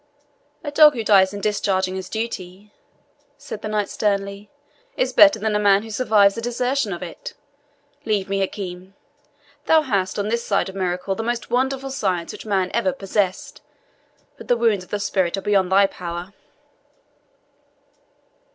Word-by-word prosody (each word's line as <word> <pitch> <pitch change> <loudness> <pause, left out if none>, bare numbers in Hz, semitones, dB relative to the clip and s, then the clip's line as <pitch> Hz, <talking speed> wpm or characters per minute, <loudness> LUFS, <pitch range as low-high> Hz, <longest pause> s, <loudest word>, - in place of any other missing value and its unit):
"A 290 - -4
dog 300 0 +7
who 230 - -3
dies 195 -3 +5
in 200 0 -7
discharging 190 -3 0
his 190 -1 -6
duty," 205 -3 -6 0.6
said 210 - -8
the - - -5
knight 210 -1 -1
sternly, 200 -1 -2 0.5
"is - - 0
better 295 -5 +7
than 215 0 -1
a - - +2
man 200 0 +4
who 225 - -9
survives 210 -3 +3
the 230 - -6
desertion 245 0 -1
of 175 0 -5
it. 170 - -9 0.7
Leave 210 -5 -1
me, 195 0 -1
Hakim; 190 -1 -5 0.7
thou 320 -1 +5
hast, 200 -8 -1
on 205 +1 -1
this 235 +1 -1
side 200 -1 0
of 190 - -10
miracle, 185 0 -2
the 195 - -4
most 235 +1 -3
wonderful 265 +2 0
science 185 -9 -2
which - - -10
man 190 -3 0
ever 235 +4 +1
possessed, 195 -5 -2 0.8
but - - -12
the 245 - +2
wounds 225 -5 +1
of - - -18
the 205 - -2
spirit 190 -2 0
are - - -3
beyond 195 -2 +1
thy 195 +1 +6
power." 175 0 -6
205 Hz, 165 wpm, -22 LUFS, 190-230 Hz, 0.8 s, dog